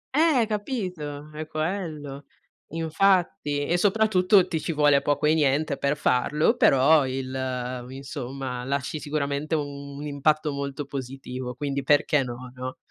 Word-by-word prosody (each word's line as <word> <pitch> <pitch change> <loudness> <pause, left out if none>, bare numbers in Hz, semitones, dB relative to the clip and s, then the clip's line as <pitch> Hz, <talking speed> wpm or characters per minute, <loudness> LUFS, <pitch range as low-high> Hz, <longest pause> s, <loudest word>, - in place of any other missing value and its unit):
Eh 300 -6 +4
capito, 180 - -4
è 155 +1 -6
quello. 155 -4 -4 0.4
Infatti 165 -3 +1
e 170 +4 +1
soprattutto 195 -1 +4
ti 165 - -2
ci - - -2
vuole 145 -2 +4
poco 145 +1 0
e 155 - +5
niente 145 -1 +2
per 140 +2 0
farlo, 145 +3 +2
però 140 +2 +5
il 130 -1 -3
insomma, 135 -1 -5
lasci 140 +3 -2
sicuramente 145 +1 -2
un 140 -2 -4
un 145 - -6
impatto 150 +1 +1
molto 140 0 -4
positivo, 130 -2 -6
quindi 140 +1 -2
perché 145 +1 +3
no, 125 0 -7
no? 130 0 -6
145 Hz, 135 wpm, -25 LUFS, 135-160 Hz, 0.4 s, e